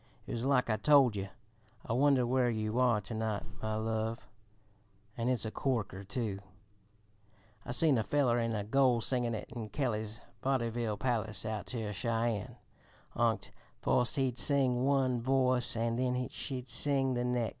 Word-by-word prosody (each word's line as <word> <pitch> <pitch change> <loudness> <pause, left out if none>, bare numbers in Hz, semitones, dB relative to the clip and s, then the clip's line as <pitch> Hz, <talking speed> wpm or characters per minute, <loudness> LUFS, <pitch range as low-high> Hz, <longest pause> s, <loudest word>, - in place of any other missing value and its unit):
"It - - -7
was 120 +1 -2
like 135 -2 +3
I 110 -2 +1
told 135 -1 +5
yer; 95 -1 -4 0.6
'I - - -2
Wonder 135 0 +4
Where 125 0 +2
You 110 +1 -1
Are 120 -4 +4
To 100 +4 -7
night, 110 -2 -2 0.2
My 110 0 -2
Love,' 110 -1 -2 0.9
and 120 +1 -1
it's 120 -4 0
a 110 - -3
corker, 110 -8 -2
too! 100 -1 -3 1.3
I - - -3
seen 140 -1 +4
a - - 0
feller 125 -4 +2
an' 115 -1 -1
a 105 - -2
goil 125 +1 +3
sing 125 +1 0
it 115 -2 -3
in 110 -3 -5
Kelly's 110 -3 -2 0.2
Voddyville 120 -4 -1
Palace 110 -3 -2
out 110 -2 -3
ter 110 -4 -4
Cheyenne 115 0 -1 0.6
onct. - - 0 0.3
Foist 125 +2 +2
he'd 130 -3 0
sing 130 -3 +3
one 130 -3 +2
voise 130 -1 +2
an' 115 0 0
then 125 0 0
she'd 130 -2 -6
sing 135 +1 +1
the 120 0 -1
nex'. 125 -2 0
120 Hz, 165 wpm, -32 LUFS, 110-130 Hz, 1.3 s, told